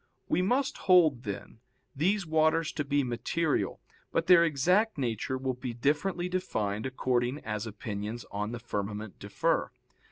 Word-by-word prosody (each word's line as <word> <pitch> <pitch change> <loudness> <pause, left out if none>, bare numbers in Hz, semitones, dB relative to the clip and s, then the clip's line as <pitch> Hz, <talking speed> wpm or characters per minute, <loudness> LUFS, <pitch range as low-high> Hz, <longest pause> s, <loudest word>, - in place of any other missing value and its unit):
We 180 - +2
must 250 +8 +1
hold, 155 -9 +5
then, 105 +2 -6 0.4
these 190 +7 +1
waters 160 0 +2
to 150 - -2
be 140 0 +1
material, 130 +6 -1 0.3
but 165 - +1
their 175 -1 +7
exact 180 +8 +2
nature 125 0 -1
will 130 0 -1
be 125 -1 -6
differently 160 +8 0
defined 110 - -2
according 125 0 0
as 105 0 -4
opinions 105 +1 -5
on 105 +2 -3
the 120 - -4
firmament 105 -3 -5
differ. - - 0
130 Hz, 140 wpm, -29 LUFS, 110-170 Hz, 0.4 s, their